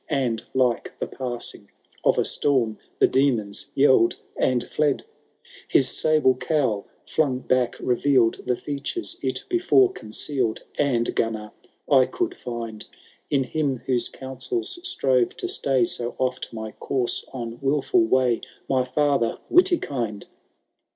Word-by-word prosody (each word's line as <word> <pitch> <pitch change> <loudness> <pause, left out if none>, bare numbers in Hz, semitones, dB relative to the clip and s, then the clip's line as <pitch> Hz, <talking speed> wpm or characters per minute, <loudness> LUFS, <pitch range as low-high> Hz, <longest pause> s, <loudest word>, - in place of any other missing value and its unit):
And— 125 -6 0
like 125 -2 +1
the - - -2
passing 125 -2 -5 0.3
of - - +3
a - - +2
storm— 120 -7 +1 0.2
The - - +5
demons 125 -5 +1
yelled 130 -4 +5 0.2
and 125 -2 +1
fled! 150 -3 0
XI. - - -31
^ - - -34 0.5
His 135 -1 +4
sable 155 -4 +3
cowl, 125 -5 0 0.2
flung 140 -5 +1
back, 130 -1 +1
revealed 125 -2 +2
The 125 - +2
features 145 - -4
it - - -2
before 375 +2 +4
concealed; 120 - -3
And, 120 -5 +1
Gunnar, 110 -1 -2 0.4
I 130 -3 +5
could 360 0 -2
find 115 - -6 0.5
In 135 -2 +2
him 135 -2 -2
whose 125 -3 +1
counsels 350 - -4
strove 130 - +1
to - - -3
stay 130 -3 +1
So 120 +1 -2
oft 125 0 -2
my 110 -1 -6
course 125 +1 -2
on 120 -2 -6
wilful 140 -2 +2
way. 125 0 +2 0.3
My 130 -1 +2
father 135 -2 +1
Witikind 140 - +2
130 Hz, 135 wpm, -24 LUFS, 120-140 Hz, 0.5 s, The